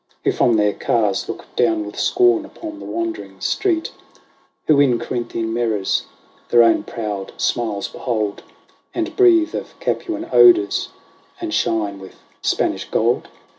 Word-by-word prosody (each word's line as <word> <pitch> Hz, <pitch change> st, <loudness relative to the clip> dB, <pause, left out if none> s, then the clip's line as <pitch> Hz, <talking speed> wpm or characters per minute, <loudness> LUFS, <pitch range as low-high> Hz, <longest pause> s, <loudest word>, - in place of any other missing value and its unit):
Who -, -, +3 dB
from 120 Hz, -, +2 dB
their 105 Hz, -1 st, +2 dB
cars 105 Hz, -4 st, 0 dB
look -, -, -6 dB
down 110 Hz, -3 st, +2 dB
with 105 Hz, -, -8 dB
scorn 365 Hz, -2 st, +3 dB
upon 315 Hz, 0 st, -9 dB
the -, -, -9 dB
wondering 340 Hz, -1 st, -4 dB
street, 340 Hz, -5 st, 0 dB, 0.7 s
Who 150 Hz, -2 st, +4 dB
in 130 Hz, -4 st, +4 dB
Corinthian 115 Hz, -2 st, -3 dB
mirrors 110 Hz, -4 st, 0 dB, 0.4 s
their 120 Hz, -1 st, +6 dB
own 115 Hz, -2 st, +4 dB
proud 105 Hz, -4 st, -5 dB
smiles 110 Hz, -5 st, -1 dB
behold. 110 Hz, -5 st, -3 dB, 0.5 s
And 335 Hz, -1 st, -2 dB
breathe 340 Hz, -4 st, +4 dB
of -, -, -6 dB
Capuan 330 Hz, -3 st, -3 dB
odours, 365 Hz, -3 st, +5 dB, 0.5 s
and 340 Hz, -2 st, -4 dB
shine 105 Hz, -3 st, 0 dB
with 95 Hz, -1 st, -12 dB, 0.3 s
Spanish -, -, -1 dB
gold -, -, +1 dB
120 Hz, 135 wpm, -20 LUFS, -, 0.7 s, their